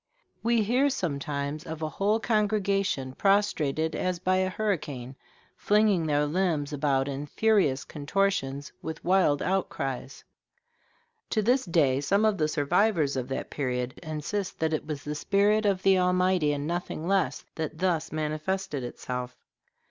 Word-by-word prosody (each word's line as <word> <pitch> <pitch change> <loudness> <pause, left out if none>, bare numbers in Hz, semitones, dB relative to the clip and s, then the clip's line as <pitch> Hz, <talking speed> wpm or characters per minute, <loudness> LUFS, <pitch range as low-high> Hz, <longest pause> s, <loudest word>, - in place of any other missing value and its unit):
We 230 -1 +2
hear 250 +7 +3
sometimes 145 - -3
of 160 0 -6
a 155 - -1
whole 205 +7 +1
congregation 200 - 0
prostrated 160 -5 +1
as 185 -1 -1
by 185 +2 +1
a 185 0 +1
hurricane, 150 - -3 0.4
flinging 205 -5 +2
their 150 0 +2
limbs 155 -3 0
about 140 -2 +1
in 140 +1 -4
furious 190 -8 +2
contortions, 145 -3 -1
with 160 0 -6
wild 180 -6 +3
outcries. 140 -9 -2 1.1
To 215 - +1
this 250 +4 +2
day 145 -6 +2
some 200 +9 +2
of 215 -3 +2
the 155 - +2
survivors 155 0 +2
of 130 -1 -2
that 135 - -4
period 125 -1 -2
insist 160 +5 -4
that 160 0 0
it 155 - -2
was 150 -3 -4
the 150 - -3
spirit 205 +7 +2
of 190 -2 0
the 190 -1 +5
Almighty, 180 -3 +2
and 145 0 -2
nothing 170 -1 -3
less, 195 0 0
that 155 -1 -4
thus 165 -3 0
manifested 155 0 -2
itself. 125 +1 -5
160 Hz, 145 wpm, -27 LUFS, 145-195 Hz, 1.1 s, the